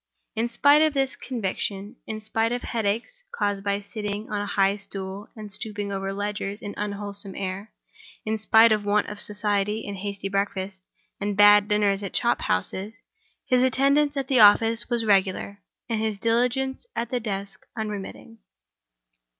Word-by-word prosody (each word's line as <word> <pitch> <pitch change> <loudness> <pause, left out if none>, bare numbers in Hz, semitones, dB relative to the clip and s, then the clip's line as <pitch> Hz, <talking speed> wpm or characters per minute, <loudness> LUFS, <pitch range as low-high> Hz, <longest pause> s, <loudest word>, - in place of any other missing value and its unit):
In 230 +2 0
spite 285 +4 +5
of 310 -2 +2
this 270 0 0
conviction; 205 -4 -4
in 215 0 -5
spite 225 +1 0
of 245 0 -3
headaches 230 - -2
caused 205 -2 -2
by 200 0 -1
sitting 210 0 -5
on 205 -1 -1
a 205 - -4
high 195 0 +2
stool 195 0 -7
and 215 -2 -8
stooping 205 0 -3
over 195 0 -3
ledgers 205 0 -4
in 205 -1 -7
unwholesome 200 -1 -2
air; 195 +2 -5 0.5
in 220 0 -1
spite 220 +1 +6
of 210 -1 +2
want 205 0 +2
of 210 - -7
society, 210 +1 +1
and 200 -1 -5
hasty 200 0 -4
breakfasts, 195 -1 -3 0.4
and 205 0 -2
bad 205 0 +7
dinners 205 -2 +2
at 195 - -5
chop 240 - +1
houses, 190 - -2 0.5
his 250 -1 +3
attendance 280 +3 +2
at 270 -1 -2
the 260 -2 +3
office 225 +3 +5
was 235 -2 0
regular, 200 0 +1 0.3
and 225 -2 -1
his 220 -2 -1
diligence 250 - 0
at 230 0 -3
the 250 - 0
desk 200 -3 -5
unremitting. 215 +1 -6
210 Hz, 160 wpm, -25 LUFS, 200-230 Hz, 0.5 s, bad